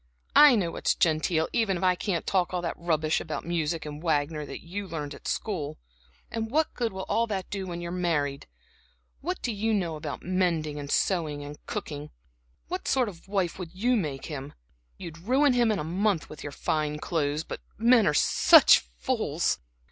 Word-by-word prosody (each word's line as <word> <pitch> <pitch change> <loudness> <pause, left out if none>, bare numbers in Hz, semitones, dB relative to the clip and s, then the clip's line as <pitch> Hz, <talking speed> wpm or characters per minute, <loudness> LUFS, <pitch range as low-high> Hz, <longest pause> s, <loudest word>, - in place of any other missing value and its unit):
I 295 -4 +9
know 180 -6 0
what's - - 0
genteel, 160 -1 +2
even 200 -5 +1
if 180 - -5
I 185 -1 +5
can't 180 -1 -2
talk 185 -1 +1
all 180 - -1
that 170 - -1
rubbish 160 -2 0
about - - -5
music 165 -1 -1
and 150 0 -7
Wagner 150 -2 0
that - - -8
you 195 +4 -5
learned 150 -4 -5
at - - -10
school. 155 -8 -3 0.5
And 225 0 -3
what 310 +5 +1
good 235 -2 -1
will 190 0 -5
all 230 +1 +1
that 195 -4 -4
do 200 - -2
you 190 - -5
when 175 -1 -5
you're 170 0 -5
married? 155 -6 -1 0.7
What 360 +5 -4
do 240 - 0
you 220 +2 0
know 170 -5 -1
about 150 -1 -6
mending 170 -5 0
and 140 -1 -6
sewing 155 -6 0
and 145 +1 -10
cooking? 150 -9 -5 0.6
What - - -4
sort 255 -4 +2
of 175 -2 -13
a - - -17
wife 190 -3 0
would 180 -1 -7
you 245 +6 +2
make 150 - -2
him? 145 -3 -6 0.4
You'd 165 -1 -8
ruin 260 - +3
him 240 -2 +3
in 210 - 0
a 150 - -2
month 185 +2 0
with 155 - -9
your 145 - -6
fine 150 +1 -1
clothes. 150 -1 -1
But - - -7 0.2
men 230 0 +5
are 150 - +2
such - - +7
fools!" - - -1
170 Hz, 200 wpm, -27 LUFS, 150-205 Hz, 0.7 s, I